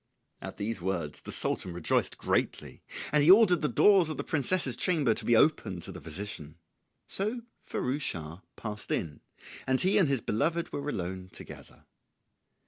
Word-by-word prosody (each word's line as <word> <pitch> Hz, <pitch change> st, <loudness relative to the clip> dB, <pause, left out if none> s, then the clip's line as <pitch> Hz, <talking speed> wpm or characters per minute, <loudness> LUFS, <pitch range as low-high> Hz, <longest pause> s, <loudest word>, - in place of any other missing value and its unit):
] -, -, -50 dB
At -, -, -8 dB
these 105 Hz, -1 st, -3 dB
words 85 Hz, -5 st, -3 dB
the -, -, -8 dB
Sultan 90 Hz, -, -1 dB
rejoiced 85 Hz, -2 st, 0 dB
greatly, -, -, -2 dB, 0.3 s
and 150 Hz, -, +4 dB
he 150 Hz, -, +4 dB
ordered 190 Hz, -3 st, +7 dB
the 150 Hz, -, +1 dB
doors 190 Hz, -, +5 dB
of 155 Hz, -, -4 dB
the -, -, -3 dB
princess's 150 Hz, -3 st, 0 dB
chamber 145 Hz, -5 st, +2 dB
to -, -, -5 dB
be 120 Hz, -, +4 dB
opened 105 Hz, -, +2 dB
to 95 Hz, -, -6 dB
the 90 Hz, -, -9 dB
physician. 80 Hz, -2 st, -6 dB, 0.5 s
So 215 Hz, +5 st, -1 dB, 0.2 s
Firouz 135 Hz, +4 st, -3 dB
Schah 85 Hz, -, -5 dB
passed 105 Hz, -2 st, -6 dB
in, 75 Hz, -5 st, -3 dB, 0.5 s
and 130 Hz, 0 st, +2 dB
he 190 Hz, +3 st, +3 dB
and 175 Hz, -7 st, +3 dB
his 135 Hz, -4 st, +1 dB
beloved 165 Hz, +12 st, -1 dB
were 145 Hz, +1 st, -3 dB
alone 95 Hz, -4 st, -4 dB
together. -, -, -12 dB
120 Hz, 170 wpm, -29 LUFS, -, 0.5 s, ordered